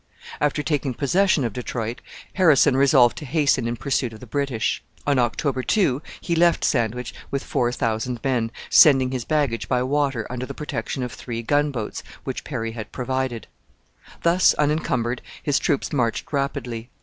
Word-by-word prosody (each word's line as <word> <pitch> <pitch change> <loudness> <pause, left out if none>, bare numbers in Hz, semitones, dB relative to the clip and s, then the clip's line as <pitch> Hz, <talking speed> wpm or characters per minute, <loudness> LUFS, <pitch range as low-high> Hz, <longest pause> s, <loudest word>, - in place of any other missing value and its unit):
After 150 0 0
taking 145 -5 -1
possession 170 +3 +2
of 115 -4 -2
Detroit, 120 -1 -4 0.3
Harrison 155 -7 +5
resolved 130 -3 +5
to 150 - -8
hasten 140 -4 +2
in 120 - -2
pursuit 125 0 -1
of 110 - -11
the 125 - -10
British. 130 -4 -1 0.2
On 140 -2 +2
October 130 +2 0
2 145 - +1 0.2
he 170 - -1
left 170 +1 +3
Sandwich 125 -2 0 0.2
with 140 - -2
four 120 -1 0
thousand 115 +1 -2
men, 125 -4 0 0.2
sending 135 -4 +6
his 125 -3 -3
baggage 145 -7 0
by 125 -1 +2
water 135 -4 0
under 125 +1 -5
the - - -7
protection 130 -3 -4
of 125 - -4
three 115 +2 -6
gunboats 145 -4 -1 0.2
which - - -4
Perry 115 0 -4
had 110 -2 -7
provided. 130 -2 -2 0.8
Thus 170 +2 +4
unencumbered, 140 -5 0 0.2
his 145 -2 +2
troops 145 -1 -1
marched 120 0 -1
rapidly. 125 -4 -3
130 Hz, 160 wpm, -23 LUFS, 120-145 Hz, 0.8 s, sending